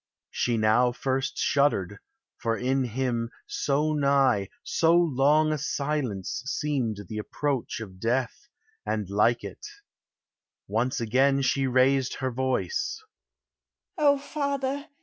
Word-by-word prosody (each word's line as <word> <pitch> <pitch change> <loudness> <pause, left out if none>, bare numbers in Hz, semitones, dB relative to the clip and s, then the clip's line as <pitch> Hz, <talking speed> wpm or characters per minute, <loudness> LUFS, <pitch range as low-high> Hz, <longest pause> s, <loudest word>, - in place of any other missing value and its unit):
She 120 -2 0
now 110 +3 +3
first 135 +2 -2
shuddered; 105 -9 +1 0.4
for 115 -2 -1
in 130 +1 0
him, 120 -1 -2 0.2
so 150 +2 0
nigh, 140 -8 +2
So 165 +1 +3
long 155 -1 +3
a 155 - -2
silence 140 -10 -2
seemed 135 - -1
the 105 -1 -5
approach 135 +3 -2
of 95 -4 -9
death, 125 - -2 0.3
And 105 -3 -2
like 115 +3 +2
it. 100 -2 -9 1.0
Once 120 +7 0
again 135 +4 +2
she 135 +1 +1
raised 130 +1 +2
her 130 -1 -2
voice: 130 - -2 0.9
"O 285 -2 +4
father! 280 0 -3
130 Hz, 115 wpm, -27 LUFS, 115-150 Hz, 1.0 s, O